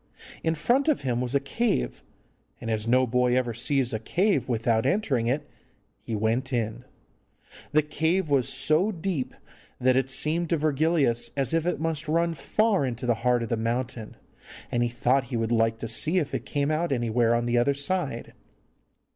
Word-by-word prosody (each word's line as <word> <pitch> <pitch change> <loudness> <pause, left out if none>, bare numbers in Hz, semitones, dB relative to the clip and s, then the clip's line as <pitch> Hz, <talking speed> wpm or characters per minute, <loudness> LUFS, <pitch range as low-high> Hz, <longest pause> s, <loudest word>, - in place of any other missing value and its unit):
In 160 0 +1
front 240 - +1
of 305 - +2
him 125 -3 -1
was 125 +2 -2
a - - +5
cave, 140 - -1 0.6
and, 115 -2 -4
as 110 0 -2
no 130 +2 +4
boy 125 +1 +2
ever 120 -2 0
sees 125 +1 0
a 110 - -1
cave 170 - 0
without 115 -1 +1
entering 135 - +1
it, 145 +4 -1 0.5
he 115 - -4
went 115 +5 0
in. 120 0 -2 0.9
The 155 0 +4
cave 160 +4 0
was 140 -4 +2
so 170 +8 +2
deep 170 -7 -3 0.4
that 130 0 +3
it 130 0 +1
seemed 160 +5 0
to 170 - +2
Virgilius 145 -5 +1
as 135 0 0
if 165 +1 +1
it 180 - 0
must 160 -1 -2
run 170 +2 +1
far 195 +6 +1
into 125 -1 -3
the 120 - +3
heart 125 -1 +2
of 115 - -5
the 115 - 0
mountain, 115 0 -3 0.5
and 120 - +1
he 120 - +1
thought 125 +2 +1
he 120 0 -3
would 115 0 -1
like 115 -1 +2
to 115 - -5
see 155 +10 +1
if 155 -6 -1
it - - -3
came 145 0 0
out 160 +1 0
anywhere 120 -2 +2
on 120 0 0
the 120 0 +2
other 140 +4 +2
side. 140 -4 -2
130 Hz, 190 wpm, -26 LUFS, 120-155 Hz, 0.9 s, a